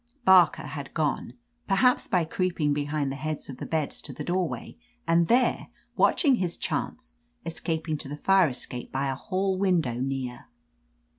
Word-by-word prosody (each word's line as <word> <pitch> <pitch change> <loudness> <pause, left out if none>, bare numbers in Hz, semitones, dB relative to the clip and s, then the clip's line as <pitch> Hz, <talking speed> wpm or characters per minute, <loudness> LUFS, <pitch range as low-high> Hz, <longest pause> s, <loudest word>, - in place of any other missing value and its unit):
Barker 185 -4 +6
had 140 -3 -7
gone, 150 -2 -1 0.3
per 195 - +2
haps 250 +5 +3
by 180 -3 +2
creeping 165 -3 0
behind 145 -1 -1
the - - -4
heads 155 0 -4
of 130 - -7
the - - -6
beds 155 -3 -2
to - - -7
the - - -6
doorway, 180 -1 -2 0.3
and 165 0 +3
there, 245 +3 +2 0.3
watching 275 -7 +4
his 180 -4 -2
chance, - - -3 0.3
escaping 160 -2 -2
to 135 - -5
the 145 - -5
fire 195 +2 +4
escape 125 -1 -5
by 135 +1 -1
a - - -3
hall/ 190 +6 -1
window 170 -11 +1
near. 130 -2 -3
160 Hz, 165 wpm, -27 LUFS, 140-185 Hz, 0.3 s, Barker